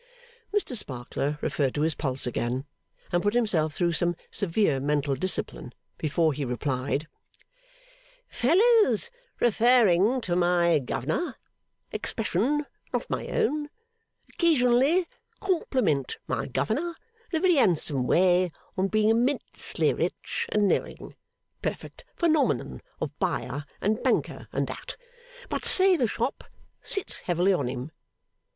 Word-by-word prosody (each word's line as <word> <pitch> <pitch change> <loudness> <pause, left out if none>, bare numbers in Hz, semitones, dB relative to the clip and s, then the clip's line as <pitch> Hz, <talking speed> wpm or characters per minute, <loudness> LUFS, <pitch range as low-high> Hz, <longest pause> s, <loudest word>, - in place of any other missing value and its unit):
Mr 410 -11 -1
Sparkler 140 - -3
referred 135 -3 0
to 145 - 0
his 160 0 +1
pulse 135 -4 -2
again, 125 +2 -2 0.5
and 175 - +2
put 205 +3 0
himself 170 -10 +1
through 175 -1 +1
some 175 +1 +1 0.2
severe 175 -6 +1
mental 145 0 0
discipline 135 - -1 0.3
before 160 0 +1
he 145 +1 -3
replied: 130 +3 -2 1.2
'Fellers 440 - +3 0.3
referring 235 -1 +4
to 180 -7 -2
my 175 -2 +3
Governor 155 - -2 0.6
expression 235 +8 -1 0.3
not - - -2
my - - -2
own 305 -11 0 0.6
occasionally 295 +1 +3 0.3
compliment 260 - 0
my 115 -4 -2
Governor 305 - -1 0.4
in 330 - +1
a - - 0
very 365 +1 +4
handsome 150 - +2
way 180 0 +4 0.3
on 190 0 +1
being 215 +1 +2
immensely 240 +5 +1
rich - - -3
and 210 -1 +3
knowing - - -2 0.5
perfect - - -5
phenomenon 315 -4 +1 0.2
of - - -3
Buyer 145 +1 -2
and 215 +3 0
Banker - - 0
and - - 0
that - - -7 0.5
but - - -3
say 380 0 +5
the 255 -8 +1
Shop 235 +5 -2 0.4
sits 395 - -2
heavily 180 +2 +2
on 145 -8 0
him. 125 +4 -5
185 Hz, 120 wpm, -27 LUFS, -, 1.2 s, say